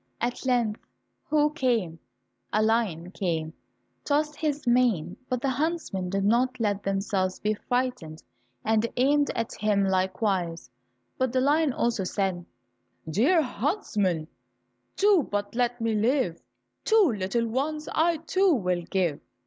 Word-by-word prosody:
At 245 +2 -3
length 235 -4 +1 0.5
who 300 -1 +3
came? 230 - 0 0.5
A 215 - +2
lion 210 -7 0
came, 170 -5 -1
and 160 - -10 0.5
tossed 300 +1 0
his 300 -2 -2
mane. 240 -9 +2
But 250 -1 -2
the 275 - +2
huntsmen 275 - -2
did 195 +1 -1
not 250 +4 +2
let 205 -3 0
themselves 195 -1 -1
be 210 0 0
frightened 245 -9 -3 0.4
and 220 +1 +2
aimed 285 +3 +3
at 230 -1 -2
him 210 -2 +2
likewise, 185 - -1 0.5
but 260 -2 +1
the 255 - +1
lion 295 +3 +3
also 235 -4 0
said, 185 -2 -1 0.6
"Dear 270 - +3
huntsman, 210 - -1 0.7
do 405 -3 +4
but 205 -5 -3
let 245 0 0
me 225 -1 0
live, 215 - +1 0.4
Two 425 - +4
little 205 +4 -1
ones 300 +6 -2
I, 330 +1 +2
too, 370 +4 +2
will 180 -6 0
give." 170 -4 -1
230 Hz, 135 wpm, -27 LUFS, 190-275 Hz, 0.7 s, do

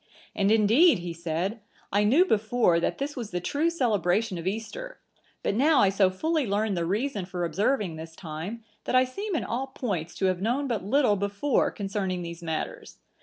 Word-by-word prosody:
"And 200 0 +1
indeed," 225 - +5
he 175 -1 -5
said, 170 +6 -3 0.3
"I 205 +1 +3
knew 285 - +5
before, 220 - +2
that - - -1
this 285 +2 -3
was 235 -6 -5
the 180 - -2
true 290 - 0
celebration 215 - +1
of 165 - -5
Easter, - - -5 0.4
but - - +1
now 285 +7 +4
I 195 - +5
so 195 -1 +3
fully 310 - -1
learn 205 +1 0
the 170 -2 -1
reason 210 +2 -1
for 180 -1 -3
observing 190 - 0
this 160 +1 -9
time, 170 +8 -6 0.2
that - - 0
I 255 0 +6
seem 395 +10 -4
in - - 0
all 255 +4 -2
points 195 -11 -4
to 195 - -1
have 185 -1 +1
known 250 +7 0
but 230 -7 -2
little 220 0 +3
before 200 +8 +1
concerning 195 -3 -3
these 170 0 -7
matters. 160 -2 -5
205 Hz, 190 wpm, -27 LUFS, 180-255 Hz, 0.4 s, I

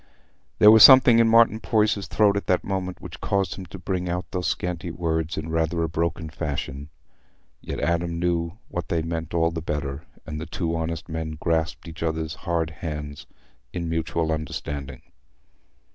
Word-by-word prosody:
There 105 - +8
was 110 0 +7
something 130 -2 +9
in 115 - +5
Martin 115 -1 +5
Poyser's 105 -2 +1
throat 105 -2 +3
at 100 - -3
that 90 - +2
moment 95 -2 -3
which - - -10
caused 100 -1 0
him 95 -2 -9
to 85 - -9
bring 90 -1 -3
out 90 +1 -2
those 90 -1 -2
scanty 90 -1 -2
words 80 -1 -2
in 80 +1 -4
rather 80 +1 0
a - - 0
broken 85 0 -2
fashion. 75 -2 -5 0.7
Yet - - -5
Adam 85 0 0
knew 85 -1 0
what 90 -4 -5
they 80 -1 0
meant 80 0 -4
all 85 0 +2
the 80 0 -4
better, 75 -2 -3 0.2
and 75 -1 -6
the 80 - -6
two 85 0 -2
honest 80 0 -3
men 80 -1 -4
grasped 80 0 -1
each 80 0 -9
other's 80 -1 -2 0.2
hard 80 -2 0
hands 75 -1 -6 0.5
in 85 -2 -3
mutual 80 0 -1
understanding. 70 -2 -5
85 Hz, 175 wpm, -24 LUFS, 80-90 Hz, 0.7 s, something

